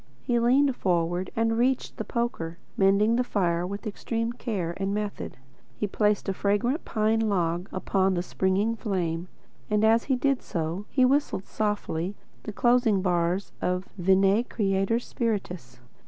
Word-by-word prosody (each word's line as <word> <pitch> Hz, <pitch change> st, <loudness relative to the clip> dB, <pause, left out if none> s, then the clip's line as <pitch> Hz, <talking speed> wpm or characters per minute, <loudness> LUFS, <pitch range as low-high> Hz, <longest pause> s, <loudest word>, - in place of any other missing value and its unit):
He 240 Hz, -1 st, +1 dB
leaned 260 Hz, +3 st, +3 dB
forward 175 Hz, -1 st, 0 dB
and 225 Hz, 0 st, +1 dB
reached 255 Hz, +1 st, 0 dB
the -, -, -2 dB
poker, 170 Hz, -9 st, -3 dB, 0.2 s
mending 205 Hz, +4 st, +3 dB
the 250 Hz, -, +2 dB
fire 175 Hz, -6 st, 0 dB
with 200 Hz, +4 st, -6 dB
extreme 230 Hz, +2 st, -2 dB
care 195 Hz, -9 st, -3 dB
and 195 Hz, +1 st, -1 dB
method. 210 Hz, -1 st, -4 dB, 0.4 s
He -, -, -1 dB
placed 210 Hz, +1 st, +1 dB
a 195 Hz, -, 0 dB
fragrant 205 Hz, -, 0 dB
pine 220 Hz, 0 st, +1 dB
log 175 Hz, -1 st, 0 dB
upon 190 Hz, 0 st, +1 dB
the 175 Hz, -, -1 dB
springing 195 Hz, +5 st, 0 dB
flame, 180 Hz, -6 st, -2 dB, 0.4 s
and 210 Hz, 0 st, +2 dB
as 225 Hz, +1 st, +4 dB
he 265 Hz, -, +2 dB
did 275 Hz, +1 st, +1 dB
so 170 Hz, +4 st, -3 dB
he 260 Hz, -2 st, +3 dB
whistled 270 Hz, -7 st, +1 dB
softly 205 Hz, -4 st, -2 dB, 0.3 s
the 215 Hz, -, -6 dB
closing 235 Hz, -3 st, +3 dB
bars 180 Hz, +1 st, 0 dB
of 180 Hz, +1 st, -1 dB
Veni, 195 Hz, +3 st, +3 dB
Creator 195 Hz, -1 st, 0 dB
Spiritus. 190 Hz, -, -3 dB
200 Hz, 150 wpm, -27 LUFS, 185-230 Hz, 0.4 s, as